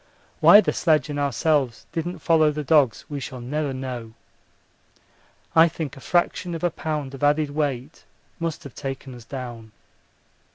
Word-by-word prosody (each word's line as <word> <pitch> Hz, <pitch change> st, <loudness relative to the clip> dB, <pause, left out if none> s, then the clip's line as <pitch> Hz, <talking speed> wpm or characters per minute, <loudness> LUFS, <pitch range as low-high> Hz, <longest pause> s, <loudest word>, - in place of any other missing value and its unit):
Why 205 Hz, -, +9 dB
the 190 Hz, -, -1 dB
sledge 155 Hz, -2 st, +2 dB
and 145 Hz, -, -3 dB
ourselves 140 Hz, -2 st, 0 dB
didn't 170 Hz, +2 st, -3 dB
follow 160 Hz, -2 st, +4 dB
the 150 Hz, 0 st, -3 dB
dogs 140 Hz, -5 st, +3 dB
we 145 Hz, -1 st, -5 dB
shall 130 Hz, -1 st, -7 dB
never 145 Hz, +4 st, -2 dB
know. 125 Hz, -4 st, -6 dB, 1.4 s
I 165 Hz, +1 st, +8 dB
think 155 Hz, -3 st, -5 dB
a -, -, -11 dB
fraction 175 Hz, +1 st, 0 dB
of 165 Hz, -, -7 dB
a 175 Hz, -, +2 dB
pound 150 Hz, -4 st, -4 dB
of 135 Hz, -, -8 dB
added 145 Hz, 0 st, +2 dB
weight 145 Hz, -1 st, -3 dB, 0.4 s
must 165 Hz, -2 st, -3 dB
have 140 Hz, -, -10 dB
taken 135 Hz, -1 st, -6 dB
us 120 Hz, -2 st, -12 dB
down. 120 Hz, -4 st, -8 dB
145 Hz, 160 wpm, -24 LUFS, 130-160 Hz, 1.4 s, Why